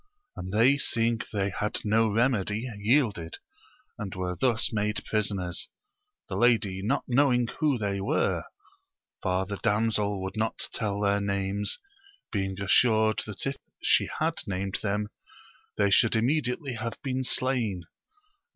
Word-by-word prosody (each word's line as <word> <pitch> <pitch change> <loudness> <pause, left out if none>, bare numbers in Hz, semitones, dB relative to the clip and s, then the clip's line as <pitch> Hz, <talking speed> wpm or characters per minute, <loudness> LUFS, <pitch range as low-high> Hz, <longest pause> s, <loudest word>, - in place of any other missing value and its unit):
And 90 +1 -6
they 125 +7 +4
seeing 115 -3 +1
they 100 -2 0
had 105 +3 -2
no 110 +1 +3
remedy 110 0 +1
yielded, 100 - +1 0.6
and 100 -4 -5
were 90 -1 -2
thus 120 -2 +1
made 105 0 -1
prisoners; 100 -5 -1 0.6
the - - -4
lady 105 -6 +2
not 125 +8 0
knowing 125 -1 +3
who 150 -5 +2
they 100 -3 -2
were, 100 - 0 0.8
for 95 0 0
the 100 +1 -5
damsel 105 -2 0
would 95 - -5
not 110 +1 -1
tell 100 -2 -1
their 100 0 +2
names, 100 0 -1 0.5
being 95 -2 -2
assured 110 +2 +3
that 105 - -5
if 135 0 -2 0.3
she - - +4
had 160 +1 0
named 95 0 -2
them 105 0 -1 0.7
they 100 -1 +3
should 115 +3 +5
immediately 130 +2 0
have 115 0 -4
been 130 -1 -1 0.2
Blain, 115 -9 -1
Mii. - - -35
105 Hz, 140 wpm, -28 LUFS, 100-120 Hz, 0.8 s, should